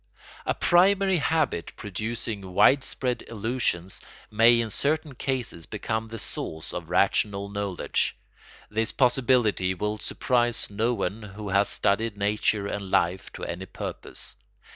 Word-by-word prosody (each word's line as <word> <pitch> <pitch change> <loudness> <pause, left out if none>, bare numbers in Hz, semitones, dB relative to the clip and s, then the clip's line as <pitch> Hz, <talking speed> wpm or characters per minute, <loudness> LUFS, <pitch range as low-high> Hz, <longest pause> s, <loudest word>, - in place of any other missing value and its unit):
] - - -17
A - - +1
primary 190 +1 +4
habit 150 - 0
producing 105 -2 -4
widespread 130 +2 +3
illusions 110 -5 -2 0.3
may 115 +2 +6
in 115 -2 -1
certain 150 +3 -1
cases 125 -10 -3
become 110 0 -3
the 115 +1 -7
source 80 -6 -5
of 85 -2 -5
rational 100 +2 +2
knowledge. 100 -3 -1 0.5
This 110 +1 +1
possibility 120 -7 +3
will 105 +3 -2
surprise 120 -2 0
no 115 +4 +1
one 100 +2 -2
who 105 0 -7
has 100 +1 +3
studied 105 +1 +1
nature 105 0 +1
and 100 -1 -4
life 90 +1 +1
to - - -8
any 90 +2 -5
purpose. - - -6
105 Hz, 130 wpm, -26 LUFS, 100-120 Hz, 0.5 s, may